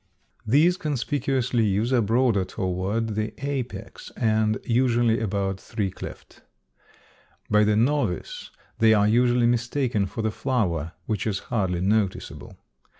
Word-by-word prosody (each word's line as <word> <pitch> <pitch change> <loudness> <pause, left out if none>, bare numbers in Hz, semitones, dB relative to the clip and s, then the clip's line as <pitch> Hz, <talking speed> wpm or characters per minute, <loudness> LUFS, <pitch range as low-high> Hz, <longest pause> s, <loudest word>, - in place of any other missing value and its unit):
These 155 +10 +4
conspicuous 140 -5 -1
leaves 110 +1 +1
are 125 - +4
broader 115 -1 +2
toward 95 +5 -2
the 110 +1 -3
apex 135 -4 -5
and 110 -1 +1
usually 120 -1 +2
about 100 -3 -2
three 105 -4 -3
cleft. - - -10 1.1
By 105 0 +5
the 105 0 +2
novice 150 - -1 0.3
they 110 -1 +5
are 105 0 +3
usually 120 +2 +3
mistaken 120 -2 0
for 115 - -5
the 110 - 0
flower, 90 - -1
which 105 -1 -2
is 100 -3 0 0.2
hardly 95 -6 0
noticeable. 100 0 -1
110 Hz, 125 wpm, -25 LUFS, 105-125 Hz, 1.1 s, By